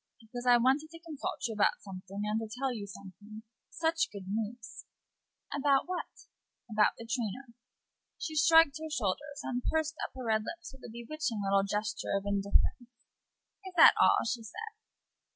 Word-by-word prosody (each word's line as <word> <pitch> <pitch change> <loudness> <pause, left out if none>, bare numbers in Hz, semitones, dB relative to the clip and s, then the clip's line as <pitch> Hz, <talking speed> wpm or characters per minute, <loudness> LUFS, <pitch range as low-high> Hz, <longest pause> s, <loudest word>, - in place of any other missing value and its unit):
"Because 245 +2 -7
I 245 -1 +8
wanted 270 +6 +2
to 330 +1 -12
consult 325 -6 -5
you 225 - -4
about 210 -1 +2
something, 195 +1 -7
and 210 +1 0
to 225 -1 -5
tell 265 -1 0
you 205 -4 -6
something. 200 +2 -11 0.3
Such 330 0 0
good 200 -2 -8
news!" 220 +2 -4 0.7
"About 280 0 +3
what?" 365 0 -5 0.4
"About 215 -2 +3
the 230 - -8
trainer." 240 0 -3 0.6
She 315 - -5
shrugged 315 -1 +6
her 315 0 -5
shoulders, 285 +3 -2
and 250 -1 -2
pursed 315 0 0
up - - -2
her 255 -1 -6
red 220 -1 +2
lips 340 +3 -7
with 265 - -15
a - - -8
bewitching 235 -1 -3
little 195 0 +3
gesture 210 +1 -1
of 195 - -4
indifference. 200 +4 +1 0.8
"Is 370 - -10
that 325 - +10
all?" - - +6
she 235 0 -1
said. 440 - -8
240 Hz, 170 wpm, -31 LUFS, 210-300 Hz, 0.8 s, that